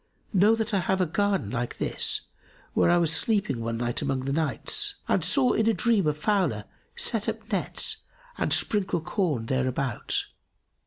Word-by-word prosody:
Know 205 Hz, +3 st, +5 dB
that 225 Hz, 0 st, -3 dB
I 200 Hz, -, +3 dB
have 190 Hz, +1 st, 0 dB
a 185 Hz, -, +3 dB
garden 200 Hz, +4 st, 0 dB
like 120 Hz, -1 st, -3 dB
this, -, -, +1 dB, 0.5 s
where -, -, +3 dB
I 175 Hz, -, +5 dB
was 165 Hz, -2 st, +2 dB
sleeping 200 Hz, -, +2 dB
one 115 Hz, 0 st, -3 dB
night 120 Hz, 0 st, -1 dB
among 135 Hz, -1 st, -1 dB
the 135 Hz, +1 st, -2 dB
nights 405 Hz, -, 0 dB
and -, -, +1 dB
saw 260 Hz, -3 st, +3 dB
in 220 Hz, 0 st, +2 dB
a 225 Hz, -, +2 dB
dream 225 Hz, -8 st, +2 dB
a 150 Hz, -, +2 dB
fowler 195 Hz, +5 st, 0 dB, 0.3 s
set -, -, +2 dB
up -, -, -7 dB
nets -, -, 0 dB, 0.4 s
and -, -, -2 dB
sprinkle 190 Hz, -5 st, +1 dB
corn 160 Hz, -, -1 dB
thereabout. 130 Hz, -1 st, -1 dB
175 Hz, 170 wpm, -26 LUFS, 135-210 Hz, 0.5 s, Know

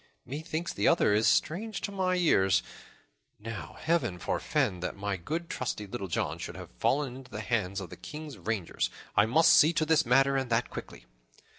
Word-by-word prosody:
Methinks 155 Hz, +4 st, -4 dB
the 100 Hz, -, +1 dB
other 105 Hz, -, +4 dB
is 110 Hz, +2 st, +3 dB
strange 200 Hz, +6 st, +1 dB
to 200 Hz, -, -3 dB
my 185 Hz, -2 st, 0 dB
ears. 95 Hz, -, +3 dB, 0.7 s
Now 115 Hz, 0 st, -7 dB
Heaven 160 Hz, -, 0 dB
forfend 90 Hz, +1 st, -1 dB
that -, -, -3 dB
my 100 Hz, 0 st, -2 dB
good 160 Hz, -, -4 dB
trusty 120 Hz, -7 st, -3 dB
Little 100 Hz, 0 st, -5 dB
John 85 Hz, -, -2 dB
should -, -, -6 dB
have -, -, -9 dB
fallen 135 Hz, -2 st, +1 dB
into 130 Hz, -1 st, -12 dB
the 110 Hz, -2 st, -5 dB
hands 105 Hz, -4 st, -1 dB
of 95 Hz, -4 st, -8 dB
the -, -, -9 dB
King's 150 Hz, -6 st, -8 dB
rangers. 100 Hz, -1 st, -2 dB, 0.3 s
I 105 Hz, -, +5 dB
must 155 Hz, +8 st, +5 dB
see 155 Hz, +3 st, +6 dB
to 155 Hz, -, +1 dB
this 160 Hz, 0 st, +4 dB
matter, 135 Hz, +2 st, +4 dB
and 130 Hz, -2 st, -2 dB
that 115 Hz, +1 st, +1 dB
quickly." -, -, -8 dB
125 Hz, 185 wpm, -29 LUFS, 105-160 Hz, 0.7 s, see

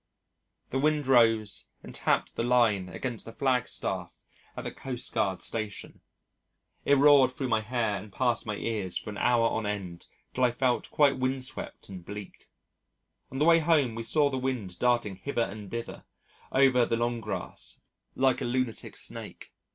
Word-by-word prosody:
The 135 Hz, -, 0 dB
wind 150 Hz, 0 st, +2 dB
rose 115 Hz, -5 st, +3 dB, 0.2 s
and -, -, -10 dB
tapped -, -, 0 dB
the -, -, -2 dB
line 115 Hz, -6 st, +3 dB
against 120 Hz, +3 st, -4 dB
the 115 Hz, -, -9 dB
flag 130 Hz, -1 st, +1 dB
staff -, -, -4 dB, 0.4 s
at -, -, -4 dB
the -, -, -4 dB
Coastguard 115 Hz, -7 st, -2 dB
Station. 110 Hz, -3 st, -4 dB, 0.8 s
It 140 Hz, -, +5 dB
roared 140 Hz, -2 st, +6 dB
through 130 Hz, 0 st, -3 dB
my 110 Hz, -1 st, +2 dB
hair 110 Hz, -2 st, -1 dB
and 100 Hz, +2 st, -10 dB
past 120 Hz, +3 st, +1 dB
my 105 Hz, -, -2 dB
ears 105 Hz, -5 st, -2 dB
for -, -, -5 dB
an 100 Hz, -, -7 dB
hour 120 Hz, -2 st, +3 dB
on 110 Hz, -2 st, -2 dB
end 95 Hz, -5 st, -5 dB, 0.3 s
till 130 Hz, -, 0 dB
I 125 Hz, -, +6 dB
felt 125 Hz, +1 st, 0 dB
quite 140 Hz, -3 st, +3 dB
windswept 130 Hz, 0 st, -4 dB
and 95 Hz, -3 st, -9 dB
bleak. 105 Hz, +1 st, -9 dB, 0.8 s
On 135 Hz, -, -7 dB
the 150 Hz, -, +3 dB
way 165 Hz, 0 st, +7 dB
home 150 Hz, -7 st, +3 dB
we 115 Hz, -, -4 dB
saw 145 Hz, +5 st, +2 dB
the 130 Hz, -, -1 dB
wind 125 Hz, -9 st, -3 dB
darting 120 Hz, -6 st, +1 dB
hither 120 Hz, +3 st, -1 dB
and 100 Hz, -1 st, -7 dB
thither 115 Hz, +2 st, -6 dB, 0.5 s
over 130 Hz, -2 st, +5 dB
the 115 Hz, -, 0 dB
long 120 Hz, 0 st, -1 dB
grass 105 Hz, -2 st, -6 dB, 0.4 s
like 130 Hz, -1 st, +2 dB
a -, -, -1 dB
lunatic 125 Hz, -1 st, -2 dB
snake. -, -, -8 dB
120 Hz, 170 wpm, -28 LUFS, 105-130 Hz, 0.8 s, way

